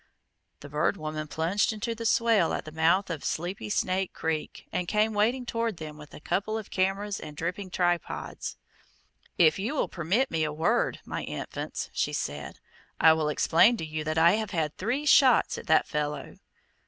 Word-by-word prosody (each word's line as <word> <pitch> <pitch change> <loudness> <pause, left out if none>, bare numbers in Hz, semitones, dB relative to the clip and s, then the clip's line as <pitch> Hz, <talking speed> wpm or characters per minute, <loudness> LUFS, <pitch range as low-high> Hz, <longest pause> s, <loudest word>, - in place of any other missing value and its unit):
The 145 - -10
Bird 150 +1 0
Woman 155 0 -4
plunged 165 +9 +1
into 220 +2 -3
the 230 0 -3
swale 225 -7 +3
at - - -3
the 155 - -8
mouth 165 +4 +2
of 160 -4 -5
Sleepy 175 - -3
Snake 185 - 0
Creek, 160 -1 -4
and 180 - -2
came 215 +4 +2
wading 235 +5 +1
toward 230 -4 -2
them, 155 -2 -7
with 150 -1 -12
a - - -9
couple 205 +7 -1
of 220 - -8
cameras 195 +2 0
and 150 -1 -9
dripping 180 +4 -3
tripods. 175 -2 -2 0.8
"If 160 +1 +5
you 225 +10 -2
will - - +1
permit 190 - 0
me 160 -1 0
a 155 - -1
word, 165 +11 0
my - - -4
infants," - - -5
she - - -1
said, - - -4 0.4
"I 160 - +7
will 155 -1 0
explain 180 +9 +4
to 160 - -4
you 155 0 -4
that 155 +1 -1
I 165 +1 +6
have 220 -2 -3
had 155 -3 -1
three 250 +9 -2
shots 270 -3 +5
at - - -12
that 160 - +4
fellow." 150 0 -4
175 Hz, 185 wpm, -28 LUFS, 155-215 Hz, 0.8 s, I